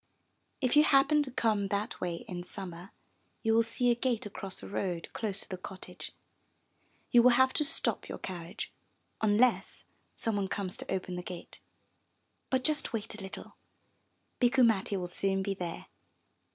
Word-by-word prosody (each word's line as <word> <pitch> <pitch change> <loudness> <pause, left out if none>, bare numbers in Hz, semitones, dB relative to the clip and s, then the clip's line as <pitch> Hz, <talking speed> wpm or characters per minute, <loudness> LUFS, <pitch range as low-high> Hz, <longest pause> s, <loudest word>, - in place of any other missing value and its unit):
If 255 0 +2
you 300 - +8
happen 290 +1 +5
to 285 - -2
come 220 -5 +1
that 200 +3 -2
way 175 -2 -3
in 175 -2 -4
Summer, 180 0 -7 0.5
you 225 -1 +3
will 225 - +6
see 235 +2 +2
a - - +3
gate 240 -2 0
across 195 -2 -6
the - - -8
road 180 -4 -2
close 205 -3 -2
to - - -7
the 185 - -4
cottage. 190 0 -8 1.0
You 240 - +8
will 250 - +7
have 260 0 +5
to 300 - +3
stop 310 +2 +1
your - - -4
carriage, 175 -2 -6 0.5
unless 220 +3 +2 0.3
some 225 -2 -1
one 195 -1 0
comes 190 -1 -3
to - - -7
open 185 -1 -2
the - - -3
gate. 180 -1 -8 0.9
But 260 -1 +1
just 305 -3 +1
wait 225 0 -3
a 215 - -9
little, 190 0 -9 0.8
Bikku 250 0 +5
Matti 205 -3 +2
will 180 - -2
soon 195 +2 0
be 200 0 -1
there. 175 -3 -5
205 Hz, 170 wpm, -31 LUFS, 185-245 Hz, 1.0 s, you